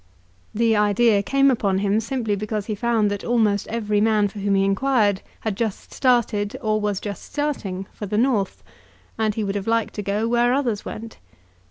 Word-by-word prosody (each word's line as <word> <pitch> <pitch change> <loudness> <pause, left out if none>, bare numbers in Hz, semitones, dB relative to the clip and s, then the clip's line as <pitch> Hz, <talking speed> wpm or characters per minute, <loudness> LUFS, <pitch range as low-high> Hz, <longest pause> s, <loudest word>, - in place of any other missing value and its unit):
The 225 0 +3
idea 210 +1 +3
came 275 +6 +3
upon 200 -6 +1
him 200 +2 +1
simply 225 -2 -2
because 210 0 -3
he 215 - -3
found 220 -1 +1
that 205 - -4
almost 215 -4 +1
every 210 -2 0
man 215 -2 +3
for 205 - -9
whom 200 0 +1
he 195 0 +3
inquired 205 -1 +2 0.2
had 220 -3 -2
just 220 -2 -4
started, 235 -4 +1
or 215 -4 0
was 205 -2 -1
just 205 -1 -6
starting, 215 -11 -2
for 210 - -6
the 210 +2 -1
North; 225 -5 0 0.6
and 215 -2 +1
he 220 - -1
would 195 -1 -2
have 200 0 -4
liked 230 0 +1
to 210 - -4
go 205 +3 -1
where 240 +1 +3
others 240 -7 -1
went. 225 +1 -8
215 Hz, 190 wpm, -22 LUFS, 205-235 Hz, 0.6 s, The